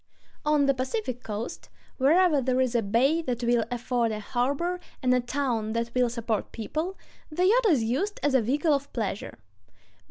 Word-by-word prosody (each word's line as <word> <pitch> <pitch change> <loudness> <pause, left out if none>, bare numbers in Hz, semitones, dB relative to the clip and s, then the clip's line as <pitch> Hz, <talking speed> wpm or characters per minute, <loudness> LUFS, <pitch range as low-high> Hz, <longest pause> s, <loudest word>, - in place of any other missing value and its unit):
On 300 -1 +3
the 275 - +4
Pacific 255 - -3
coast,... 215 +6 -6 0.3
wherever 310 +2 +4
there 255 0 +1
is 255 -2 +1
a 235 - +2
bay 250 +10 +2
that 250 -5 -3
will 235 -1 +2
afford 240 -1 0
a 215 - -3
harbor, 280 - -1 0.2
and 250 0 +4
a 250 - +4
town 240 -4 -1
that 230 0 -2
will 250 -1 +2
support 230 -3 -2
people, 310 - -4 0.3
the 350 +4 0
yacht 460 +4 +4
is 280 -10 +3
used 285 - -1
as 290 - +2
a 260 - +5
vehicle 290 +7 +1
of 280 0 -2
pleasure.... 210 -4 -3
255 Hz, 180 wpm, -27 LUFS, 235-300 Hz, 0.3 s, a